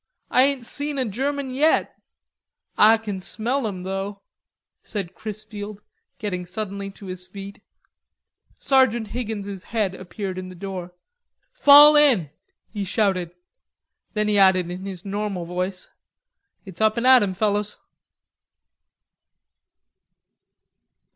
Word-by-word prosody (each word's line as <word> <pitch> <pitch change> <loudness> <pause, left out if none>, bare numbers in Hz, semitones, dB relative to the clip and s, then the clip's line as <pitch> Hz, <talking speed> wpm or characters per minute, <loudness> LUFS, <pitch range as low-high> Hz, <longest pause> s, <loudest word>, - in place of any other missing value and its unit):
I 255 - +5
ain't 275 -3 -1
seen 290 +3 -2
a 260 - 0
German 270 +5 -2
yet." 295 +5 +2 0.8
"Ah 220 +2 +6
kin 210 -4 -5
smell 230 +7 -2
'em 185 -3 -6
though," 195 +1 -5 0.6
said 195 -5 -5
Chrisfield, 210 -1 -8 0.3
getting 185 -4 -4
suddenly 195 +2 -5
to 195 +1 -13
his 185 -1 -7
feet. 195 +1 -10 1.0
Sergeant 245 -5 +2
Higgins' 205 -5 -5
head 210 -4 -2
appeared 185 0 -6
in 185 0 -7
the 185 - -11
door. 180 -1 -6 0.6
"Fall 295 -10 +8
in," 250 - +4 0.4
he 205 -2 -3
shouted. 185 -3 0 0.8
Then 210 0 +1
he 210 -1 +2
added 185 -2 +4
in 185 +2 -6
his 190 -1 -8
normal 200 -3 -3
voice, 180 +2 -4 0.7
"It's 190 0 -9
up 220 +1 +3
and 235 - -1
at 260 -1 +8
'em, 190 -2 -1
fellers." 210 +1 -1
205 Hz, 120 wpm, -23 LUFS, 190-225 Hz, 1.0 s, Fall